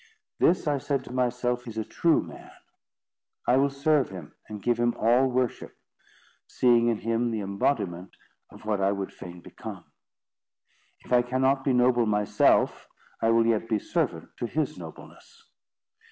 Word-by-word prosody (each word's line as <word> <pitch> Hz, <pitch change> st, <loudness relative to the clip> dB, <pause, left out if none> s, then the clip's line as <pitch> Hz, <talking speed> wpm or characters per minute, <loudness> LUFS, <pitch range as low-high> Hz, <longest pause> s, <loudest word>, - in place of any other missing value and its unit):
"This," 180 Hz, -, +3 dB
I 145 Hz, -2 st, +1 dB
said 135 Hz, -1 st, -2 dB
to 125 Hz, -, -10 dB
myself, 125 Hz, 0 st, -1 dB
"is 110 Hz, -1 st, -7 dB
a 110 Hz, -, -1 dB
true 165 Hz, +7 st, +2 dB
man. -, -, -12 dB, 1.0 s
I 125 Hz, -, +4 dB
will 140 Hz, +1 st, +3 dB
serve 140 Hz, 0 st, +1 dB
him, 90 Hz, -6 st, -10 dB, 0.2 s
and 105 Hz, -1 st, -6 dB
give 120 Hz, +3 st, 0 dB
him 120 Hz, 0 st, +1 dB
all 120 Hz, +4 st, +3 dB
worship, 125 Hz, -1 st, -2 dB, 0.7 s
seeing 120 Hz, -2 st, +3 dB
in 115 Hz, -2 st, +1 dB
him 115 Hz, +2 st, -1 dB
the 110 Hz, -2 st, -2 dB
imbodiment 95 Hz, -3 st, -2 dB, 0.4 s
of -, -, -15 dB
what 105 Hz, -2 st, 0 dB
I 100 Hz, +1 st, +2 dB
would 100 Hz, -1 st, -5 dB
fain 90 Hz, -1 st, -10 dB
become. -, -, -9 dB, 1.2 s
If -, -, -5 dB
I 125 Hz, -, +6 dB
cannot 130 Hz, +2 st, +1 dB
be 135 Hz, -, +1 dB
noble 125 Hz, -1 st, +3 dB
myself, 105 Hz, -1 st, +2 dB, 0.3 s
I 115 Hz, -, +2 dB
will 115 Hz, 0 st, +4 dB
yet 115 Hz, 0 st, 0 dB
be 110 Hz, -, +2 dB
servant -, -, -2 dB
to 120 Hz, -, -2 dB
his 150 Hz, +2 st, -2 dB
nobleness." 80 Hz, -3 st, -13 dB
120 Hz, 160 wpm, -27 LUFS, 105-130 Hz, 1.2 s, I